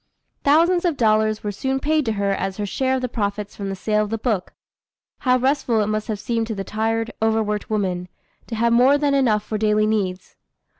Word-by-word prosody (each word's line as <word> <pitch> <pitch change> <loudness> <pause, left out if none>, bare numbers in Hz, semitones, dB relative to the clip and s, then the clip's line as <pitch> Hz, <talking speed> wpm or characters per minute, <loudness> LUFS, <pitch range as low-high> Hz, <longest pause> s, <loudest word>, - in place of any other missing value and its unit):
Thousands 335 +5 +4
of 340 -5 0
dollars 215 -1 +2
were 210 - -2
soon 265 +7 -2
paid 305 +1 +1
to 225 - 0
her 200 -1 0
as 195 -1 -2
her 210 - -2
share 260 +6 0
of 260 - -2
the - - +1
profits 205 -3 -3
from 200 -1 -5
the 195 - -3
sale 210 +2 0
of 210 - -5
the 225 - -2
book. 215 -5 -2 0.7
How 255 -2 +3
restful 260 -3 +1
it - - +1
must 215 0 -2
have 215 -3 -3
seemed 230 0 -1
to 220 - -3
the 195 - -4
tired, 225 +2 -1
over 220 0 +2
worked 210 0 -3
woman, 185 -4 -1 0.4
to 230 - -4
have 235 +1 +2
more 255 +4 +5
than 290 -1 +1
enough 230 -7 +2
for 215 0 -4
daily 215 0 +2
needs! 190 -4 -2
220 Hz, 220 wpm, -22 LUFS, 210-255 Hz, 0.7 s, more